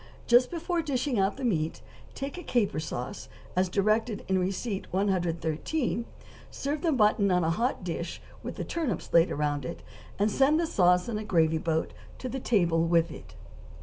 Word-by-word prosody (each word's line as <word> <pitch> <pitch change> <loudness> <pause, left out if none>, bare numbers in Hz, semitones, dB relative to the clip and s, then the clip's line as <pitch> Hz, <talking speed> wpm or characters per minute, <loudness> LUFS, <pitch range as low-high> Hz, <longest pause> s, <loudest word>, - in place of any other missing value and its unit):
Just 245 +1 +5
before 340 0 -1
dishing 275 -4 -1
the 200 +7 0
meat, 165 -8 -1 0.4
make 275 +1 -4
a 360 - -6
caper 235 - 0
sauce, 125 - -5 0.3
as 185 0 +2
directed 215 +3 +1
in 190 0 +2
receipt 195 +3 -2
No. 185 - -1
113; 190 - 0 0.4
serve 285 +2 -3
the 335 - +2
mutton 210 -5 +3
on 180 -1 +3
a 160 - +2
hot 230 +4 -1
dish, 170 -1 -4 0.2
with - - -6
the - - -4
turnips 290 - -3
laid 170 +1 +6
around 145 -1 -1
it, 170 - -6 0.3
and 210 +2 +2
send 275 +7 +4
the 340 - +2
sauce 180 - +3
in 220 -3 -2
a - - -4
gravy 160 -5 +2
boat 160 0 -1 0.2
to 255 - -5
the 265 +2 -3
table 170 -9 +2
with 170 -1 +3
it. - - -11
200 Hz, 180 wpm, -28 LUFS, 170-250 Hz, 0.4 s, laid